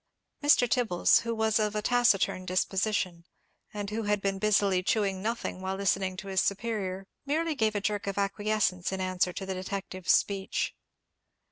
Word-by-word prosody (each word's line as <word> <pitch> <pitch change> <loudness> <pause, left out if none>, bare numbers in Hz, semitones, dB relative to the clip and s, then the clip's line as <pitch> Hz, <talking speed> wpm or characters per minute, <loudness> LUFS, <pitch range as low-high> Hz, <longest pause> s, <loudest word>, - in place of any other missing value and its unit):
Mr. 290 -4 +5
Tibbles, 230 -8 +3
who 230 0 -3
was 220 0 +2
of 215 0 0
a 210 - 0
taciturn 205 -7 +2
disposition, 185 -1 -1 0.5
and 205 -1 -5
who 220 +2 -2
had 210 -1 0
been 195 -1 -2
busily 200 -3 +3
chewing 195 -1 0
nothing 225 -3 -3
while 190 0 -2
listening 190 -1 0
to 195 - -7
his 190 -1 +1
superior, 195 -3 -2 0.2
merely 315 +3 0
gave 220 -6 0
a 205 - 0
jerk 205 0 -2
of 200 - -3
acquiescence 200 -2 0
in 190 - -3
answer 185 -1 0
to 190 - -6
the 190 - -3
detective's 185 -1 -3
speech. 195 -1 0
200 Hz, 165 wpm, -29 LUFS, 190-215 Hz, 0.5 s, Mr